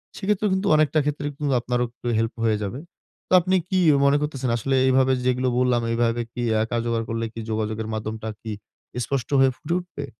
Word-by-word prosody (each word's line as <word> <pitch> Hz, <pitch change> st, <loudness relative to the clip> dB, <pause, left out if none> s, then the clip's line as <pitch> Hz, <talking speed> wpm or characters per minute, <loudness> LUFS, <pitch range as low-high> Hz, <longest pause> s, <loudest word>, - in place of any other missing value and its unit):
সেই 195 Hz, -, -7 dB
ক্ষেত্রে 210 Hz, 0 st, +2 dB
কিন্তু 190 Hz, +2 st, 0 dB
অনেকটা 155 Hz, 0 st, +3 dB
ক্ষেত্রে 145 Hz, 0 st, -2 dB
কিন্তু 145 Hz, -1 st, -1 dB
আপনারও 125 Hz, +1 st, 0 dB
একটু 120 Hz, +1 st, -10 dB
help 115 Hz, 0 st, -1 dB
হয়ে 110 Hz, -2 st, +2 dB
যাবে। 105 Hz, +6 st, -4 dB, 0.5 s
তো -, -, -2 dB
আপনি 185 Hz, +2 st, +1 dB
কি 190 Hz, -2 st, +2 dB, 0.3 s
মনে 140 Hz, +1 st, +4 dB
করতেসেন 135 Hz, -4 st, -2 dB
আসলে 135 Hz, +4 st, 0 dB
এইভাবে 130 Hz, 0 st, +4 dB
যেগুলো 125 Hz, 0 st, +1 dB
বললাম, 125 Hz, -1 st, +2 dB
এইভাবে 115 Hz, 0 st, +1 dB
কি 120 Hz, -, -4 dB, 0.2 s
আ -, -, +2 dB
কার্যকর 115 Hz, -1 st, 0 dB
করলে 115 Hz, 0 st, -2 dB
কি 115 Hz, -, -7 dB
যোগাযোগের 110 Hz, 0 st, -2 dB
মাধ্যমটা 110 Hz, 0 st, -4 dB
কি 110 Hz, -, -6 dB, 0.5 s
স্পষ্ট 135 Hz, -3 st, -2 dB
হয়ে 135 Hz, 0 st, +5 dB
ফুটে 170 Hz, +3 st, -2 dB
উঠবে? 175 Hz, -5 st, -7 dB
125 Hz, 195 wpm, -24 LUFS, 115-145 Hz, 0.5 s, হয়ে